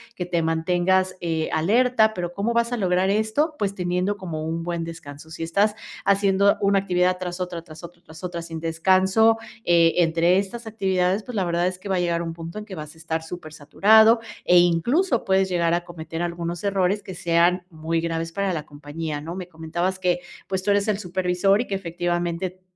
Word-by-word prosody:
que 180 - -4
te 170 -1 0
mantengas, 180 +3 +1
eh, 165 -2 -1
alerta, 220 +6 +3
pero 175 -3 -4
¿cómo 205 +5 -1
vas 235 0 +1
a 245 - -1
lograr 185 -2 +1
esto? 220 +10 +1
Pues, 200 -2 -1
teniendo 180 +2 -1
como 160 -5 -5
un 165 +1 -3
buen 170 -1 -3
descanso. 160 -2 -9
Si 165 - -8
estás 200 +6 +1 0.3
haciendo 200 0 +3
una 200 0 +3
actividad 180 -1 +1
tras 180 -1 -5
otra, 175 -2 -4
tras 155 +1 -13
otra, 170 0 -11
tras 160 +3 -14
otra, 175 -1 -4
sin 165 -1 -6
descanso, 190 +7 +3 0.3
eh, 170 -1 +4
entre 170 +1 +3
estas 225 +4 -5
actividades, 190 -2 0
pues, 250 0 -8
la 195 -3 +1
verdad 170 0 0
es 185 0 -4
que 200 - -8
va 190 - +1
a - - +1
llegar 170 -1 0
a - - -3
un 165 -1 -4
punto 165 +4 -7
en 210 - -8
que 200 -3 -8
vas 155 -1 -8
a - - -19
estar 160 0 -3
súper 160 -2 -8
saturado, 220 +10 +5 0.3
e 180 - +5
incluso 235 - +2
puedes 190 0 +2
llegar 170 -2 +1
a 175 0 0
cometer 165 -1 -7
algunos 170 0 -4
errores 200 0 +1
que 190 -3 -9
sean 175 +1 +2
muy 165 +1 -2
graves 165 0 -3
para 195 0 -1
la 155 -2 -4
compañía 145 +1 -6
¿no? 165 +3 -6
Me 185 -2 -6
comentabas 170 +3 -3
que, 180 -1 +1 0.3
pues, 190 -1 -1
tú 205 - +1
eres 200 +1 +2
el 205 -2 0
supervisor 185 +2 +1
y 245 - -5
que 195 - -2
efectivamente 175 0 -3
180 Hz, 210 wpm, -23 LUFS, 165-195 Hz, 0.3 s, saturado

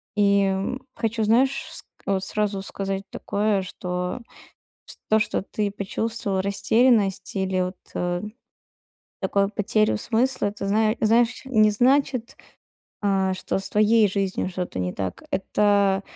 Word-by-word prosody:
И, 200 -1 +4
м, 195 +7 -2
хочу 225 -1 -1
знаешь, 255 +5 +2
ск - - -5 0.2
вот 195 -1 0
сразу 205 -1 -1
сказать 195 0 -4
такое 205 -1 0
что, 180 +3 -4 0.7
с - - -8
то 220 - +4
что 215 - 0
ты 205 0 -2
почувствовал 200 0 -2
растерянность 200 -1 +2
или 190 -1 0
вот 180 0 -2 1.4
такое 200 +1 +1
потерю 215 +1 +1
смысла, 240 +1 0
это 200 -1 -5
знае 215 +2 +2
знаешь, 230 +2 +2
не 215 -5 +4
значит, 255 +1 +2 0.7
а, 190 -2 +2
что 185 - -2
с 195 - -3
твоей 215 +1 +4
жизнью 195 -1 -1
что-то 180 - -4
не 90 0 -1
так. 95 -2 -4
Это 200 0 +2
200 Hz, 130 wpm, -24 LUFS, 190-220 Hz, 1.4 s, И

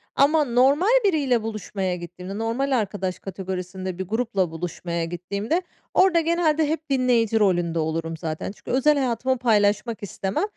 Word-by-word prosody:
Ama 300 +2 +4
normal 270 +7 +3 0.2
biriyle 280 - +2
buluşmaya 200 -4 -3
gittiğimde, 180 +3 -8
normal 230 +5 -1
arkadaş 195 -4 -2
kategorisinde 185 -1 -5
bir 190 -1 -4
grupla 205 -5 0
buluşmaya 170 0 -3
gittiğimde 200 - -2 0.3
orada 370 -2 +5
genelde 320 -2 +2
hep 315 -1 -3
dinleyici 245 -4 +2
rolünde 175 -5 +2
olurum 165 +1 -2
zaten. 155 +3 -4
Çünkü - - -9
özel 285 +4 +3
hayatımı 260 0 0
paylaşmak 215 -1 +1
istemem. 195 - -2
215 Hz, 135 wpm, -24 LUFS, 185-265 Hz, 0.3 s, orada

